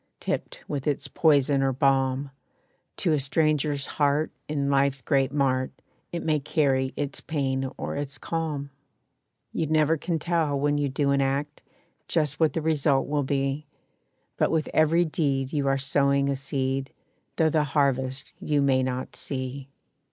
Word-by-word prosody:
Tipped - - -4
with 140 -2 -3
its 145 - -1
poison 145 -3 +3
or 135 0 +2
balm, 135 +1 +1 0.7
To 170 -4 +1
a 150 - +2
stranger's 145 0 +1
heart 145 +1 +1 0.2
in 145 -2 -1
life's 140 0 +2
great 135 +1 +1
mart, 130 -3 +1 0.4
It 170 - -3
may 155 -2 +2
carry 135 -2 +1
its 145 -1 -3
pain 135 -3 -1
or - - -4
its 140 -1 -4
calm. 150 -4 -3 0.8
You 160 - -1
never 155 +1 +3
can 165 +2 -2
tell 160 -3 0
when 145 +1 +1
you 145 -1 0
do 140 +1 +1
an 140 0 +3
act 140 +2 -1 0.5
Just 150 -3 0
what 160 -4 +3
the 165 - -2
result 150 -3 +2
will 150 0 0
be; 140 +1 -1 0.7
But - - +2
with 160 -2 0
every 160 +2 +4
deed 140 -4 -1
you 145 -2 0
are 135 0 +3
sowing 140 0 +2
a 140 - +1
seed, 135 0 -2 0.4
Though 160 -2 +3
the 155 -1 +3
harvest 135 -2 0
you 150 -1 0
may 135 -2 +3
not 130 0 -3
see. 130 0 -5
140 Hz, 160 wpm, -26 LUFS, 135-150 Hz, 0.8 s, every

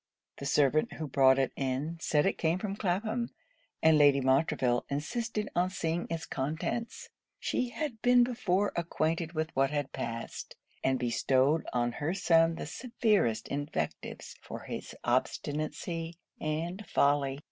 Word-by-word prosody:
The 140 - -4
servant 145 +2 +3
who 160 - -4
brought 130 -1 +5
it 135 -1 +1
in, 140 +5 -2
said 150 -2 +2
it 195 - 0
came 165 +1 +2
from 195 0 -3
Clapham; 220 +5 -1 0.5
and 160 -1 +6
Lady 145 -1 +6
Montreville 130 -2 +2
insisted 210 - -2
on 180 +1 +2
seeing 170 -2 -2
its 165 -1 -3
contents. 160 - -3 0.3
She 250 - -1
had 240 -2 -4
been 245 0 +6
before 205 -5 +1
acquainted 165 0 -1
with 160 0 -2
what 135 0 +3
had 145 -2 -2
passed; 115 -3 -5 0.3
and 130 0 +2
bestowed 130 +5 +2
on 120 -1 +1
her 150 +8 -2
son 165 -3 +4
the - - -5
severest 200 - 0
invectives 145 +1 -4
for - - -7
his - - -7
obstinacy 160 +3 -2 0.2
and 165 +6 -3
folly. 140 -1 +2
160 Hz, 140 wpm, -30 LUFS, 140-185 Hz, 0.5 s, and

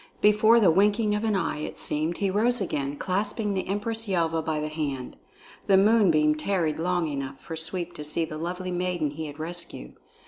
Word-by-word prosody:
Before 215 +2 +5
the 195 -7 +5
winking 210 +4 +3
of 210 +1 -1
an 220 -2 +1
eye, 190 - -1
it 150 - -5
seemed, 155 +3 -1
he 195 -2 0
rose 235 +5 +2
again, 145 -7 -2
clasping 205 +4 -1
the 190 - -2
Empress 220 +3 -2
Yelva 165 -4 +1
by 160 -1 -2
the 150 - -2
hand. 145 -5 -4 0.5
The 195 - +6
moonbeam 190 -8 +4
tarried 160 -1 -1
long 175 0 0
enough 140 -2 -5
for 165 - -7
Sweep 175 +2 -4
to 150 - -6
see 155 +2 -1
the 155 -1 -7
lovely 180 +2 -4
maiden 175 -4 -1
he 155 +1 -5
had 145 0 -9
rescued. 170 - -6
175 Hz, 195 wpm, -26 LUFS, 155-205 Hz, 0.5 s, The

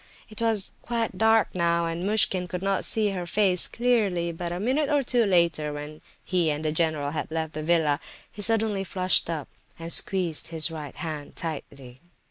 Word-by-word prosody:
It 215 +1 -6
was 225 -4 +2
quite 230 -4 -2
dark 220 0 +4
now, 170 -1 +1
and 165 +1 -3
Muishkin 195 -3 +2
could 180 +1 -5
not 195 -1 0
see 215 -2 +2
her 180 -3 -4
face 185 -1 +2
clearly, 210 -8 +1
but 170 +1 -5
a 175 - -3
minute 270 +8 0
or 290 -2 +2
two 240 -2 +2
later, 170 -5 +2
when 150 +1 -8 0.2
he 180 -4 +2
and 150 +1 -2
the 155 - +1
general 155 -3 +1
had 160 - -4
left 160 -1 -3
the 155 - -4
villa, 155 -2 +2 0.3
he 210 - -9
suddenly 220 -2 +1
flushed 185 -2 +2
up, 155 -4 -3 0.3
and 165 0 0
squeezed 180 -5 +1
his 165 0 +1
right 150 -4 -7
hand 155 -3 -6
tightly. 140 -5 -6
175 Hz, 185 wpm, -26 LUFS, 160-205 Hz, 0.3 s, dark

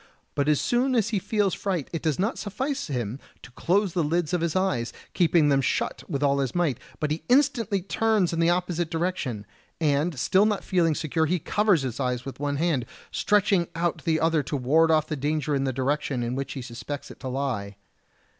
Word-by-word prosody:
But 145 0 +1
as 150 - +3
soon 255 +2 +1
as 225 -2 +2
he 215 -4 0
feels 205 -1 0
fright 185 -8 -2
it 165 - -2
does 155 -3 0
not 205 +5 -1
suffice 260 +7 -3
him 125 -3 -3 0.2
to - - -12
close 185 - +1
the 175 - +1
lids 160 +1 0
of 175 - +1
his 170 0 -1
eyes, 160 -12 0 0.2
keeping 170 -4 +4
them 135 -1 +3
shut 130 - -1
with 140 0 -1
all 140 0 +3
his 135 +1 -2
might, 165 -9 +1 0.2
but 150 -1 -1
he 155 +1 -2
instantly 245 -8 +2
turns 215 -3 +1
in 165 - -1
the 165 0 +4
opposite 175 -2 0
direction; 160 - -2 0.3
and 150 0 +1
still 190 - +3
not 210 -2 -1
feeling 170 -4 +2
secure 160 +1 0
he 180 +4 +1
covers 195 -1 +2
his 130 -1 -4
eyes 125 -2 -1
with 135 - -7
one 145 0 -1
hand, 145 -6 0 0.2
stretching 195 -4 +2
out 170 0 -1
the 160 -1 +1
other 160 -1 +2
to 145 +1 -3
ward 155 +6 +3
off 155 -2 +3
the 155 - -3
danger 150 +1 -1
in 135 -1 +1
the 135 - 0
direction 135 0 -1
in 120 +1 -2
which 135 +1 -3
he 135 - -6
suspects 120 +4 -7
it - - -13
to - - -6
lie. 125 -7 -3
160 Hz, 210 wpm, -26 LUFS, 140-180 Hz, 0.3 s, keeping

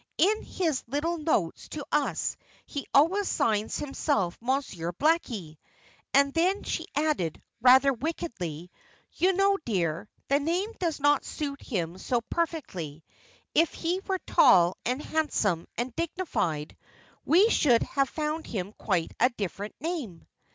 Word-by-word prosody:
In 420 +5 +3
his 320 -8 -1
little 315 +7 -1
notes 220 - -1
to 295 -3 -6
us 295 -1 0 0.3
he 285 - -6
always 365 +8 +4
signs 215 -1 0
himself 270 - -1
'Monsieur 235 -10 -1
Blackie.'" 230 - 0 0.5
And 280 0 +4
then 370 +5 +1
she 330 - -3
added, 290 - 0 0.2
rather 260 +3 +7
wickedly, 185 - -4 0.4
"You 375 +2 +2
know, 390 +1 +3
dear, 180 -3 -1 0.2
the 280 +1 +3
name 350 +8 -1
does 335 -5 -1 0.2
suit 280 -2 -5
him 180 -6 -3
so 245 +2 0
perfectly. 185 - -3 0.5
If 330 +1 +3
he 350 +3 -1
were 380 -1 +1
tall, 175 -1 +5
and 255 +4 -1
handsome, 220 - 0
and 240 +1 -3
dignified, 300 - -2 0.5
we 390 +8 +5
should 245 -7 +4
have 275 -1 0
found 310 +1 -3
him 200 -1 -4
quite 180 -6 0
a 250 - +5
different 205 -3 -5
name." 295 - -4
275 Hz, 130 wpm, -28 LUFS, 195-330 Hz, 0.5 s, rather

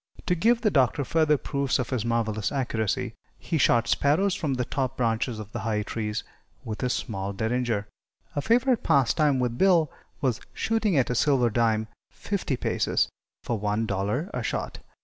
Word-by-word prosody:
To 180 - +2
give 230 +7 +3
the 215 - +2
Doctor 135 -1 +2
further 155 -1 +3
proofs 140 -1 -1
of 125 -1 -3
his 125 -5 0
marvelous 115 -2 0
accuracy, 120 -3 -1 0.2
he 165 -2 -2
shot 115 -2 +4
sparrows 165 +11 +2
from 155 -9 -1
the 125 -1 -1
top 130 0 -2
branches 115 0 0
of 105 -1 -8
the - - -4
high 105 -1 -1
trees 105 0 -3 0.4
with 110 -1 -5
his 125 -1 0
small 100 -4 -3
derringer. 110 0 -1 0.5
A 145 - 0
favorite 240 - +3
pastime 140 -1 +3
with 125 0 -1
Bill 175 -6 +4 0.3
was 125 -5 0
shooting 220 -6 +1
at 130 -2 +2
a - - +2
silver 125 -2 +3
dime, 110 -1 +1 0.2
fifty 185 -10 -3
paces, - - +1 0.3
for 115 -3 -2
one 105 +2 0
dollar 105 - -2
a - - -2
shot. - - -3
125 Hz, 170 wpm, -26 LUFS, 110-150 Hz, 0.5 s, shot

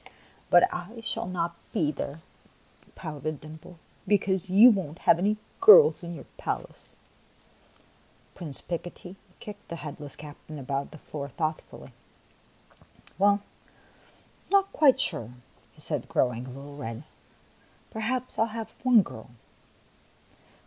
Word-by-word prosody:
" - - -30
But 175 - +7
I 205 +7 -7
shall 225 +1 -3
not 170 -2 -2 0.2
be 150 -2 +1
there," 145 +2 -6 0.7
pouted 155 -1 -5
Dimples, 155 +3 -12 0.3
"because 190 -2 +1
you 215 +7 +9
won't 175 -7 -3
have 165 - +6
any 210 +3 +1 0.2
girls 445 +4 +8
in 170 -1 -6
your 150 - -10
palace." - - -5 1.4
Prince 150 -6 -5
Picotee 175 +1 -6 0.2
kicked 205 -1 -10
the 170 - -5
headless 150 -2 -7
captain 150 +1 -10
about 135 0 -3
the - - -11
floor 140 -1 -7
thoughtfully. 155 +3 -4 0.7
" - - -26
Well, 200 +1 +4
I - - -30
'm - - -30
not 395 0 +3
quite 270 -4 +5
sure," 140 - -2 0.4
he - - -20
said, - - -4
growing 125 0 0
a - - -8
little 140 +3 -10
red. 115 -1 -6 0.5
" - - -32
Perhaps 245 +3 -3
1 225 - +3
11 - - -11
have 225 -1 -6
one 250 -4 +7
girl." 110 -9 -10
170 Hz, 140 wpm, -27 LUFS, 145-210 Hz, 1.4 s, you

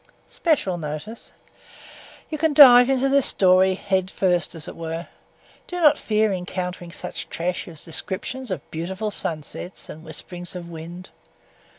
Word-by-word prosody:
_ - - -37 0.2
SPECIAL 230 - 0
NOTICE 155 +9 -7 1.0
You 310 - -3
can 315 -2 +1
dive 245 -3 +9
into 270 0 +2
this 275 -1 +3
story 185 0 +4
head 190 -1 -1
first 180 -3 0
as 160 -2 -7
it - - -8
were. 165 +1 -5 0.6
Do 355 - -4
not 300 -3 +5
fear 215 -1 +1
encountering 180 -1 -4
such 160 -1 -6
trash 175 +2 -3
as 160 -4 -9
descriptions 215 +9 -5
of 185 - -5
beautiful 190 +6 -3
sunsets 165 +1 -5
and 160 - -9
whisperings 175 +1 -6
of 170 -1 -7
wind. 170 +3 -9
185 Hz, 150 wpm, -23 LUFS, 170-230 Hz, 1.0 s, dive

